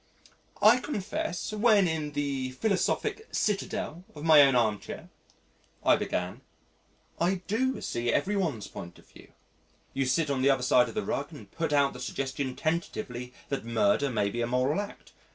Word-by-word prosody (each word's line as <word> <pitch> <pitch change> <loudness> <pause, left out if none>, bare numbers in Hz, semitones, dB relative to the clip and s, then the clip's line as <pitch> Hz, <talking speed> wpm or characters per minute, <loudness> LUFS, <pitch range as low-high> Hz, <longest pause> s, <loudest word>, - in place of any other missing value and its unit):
"I 230 +4 +7
confess, 200 -8 -3
when 210 -3 +4
in 155 -2 -2
the 135 -3 -2
philosophic 220 - -1
citadel 195 -4 -2
of 150 - -8
my 160 -2 +8
own 135 -2 +5
armchair," 110 -4 -1 0.7
I - - +6
began, 90 +7 -3 0.8
"I 180 +2 +1
do 260 +5 0
see 120 0 -1
every 195 - +1
one's 155 - -1
point 85 0 -9
of - - -19
view. - - -17 0.6
You 135 -1 0
sit 145 +3 +1
on 135 -2 0
the 135 - +4
other 135 -2 +2
side 125 0 +4
of - - -10
the 215 - -1
rug 140 +3 -2
and 150 - -12
put 165 -2 -2
out 140 -1 +3
the - - -9
suggestion 135 -1 -3
tentatively 155 - -3 0.2
that 140 - -2
murder 115 +4 +2
may 105 -5 0
be 120 - -3
a 115 - 0
moral 130 +7 +1
act. 205 - -10
145 Hz, 170 wpm, -28 LUFS, 125-185 Hz, 0.8 s, my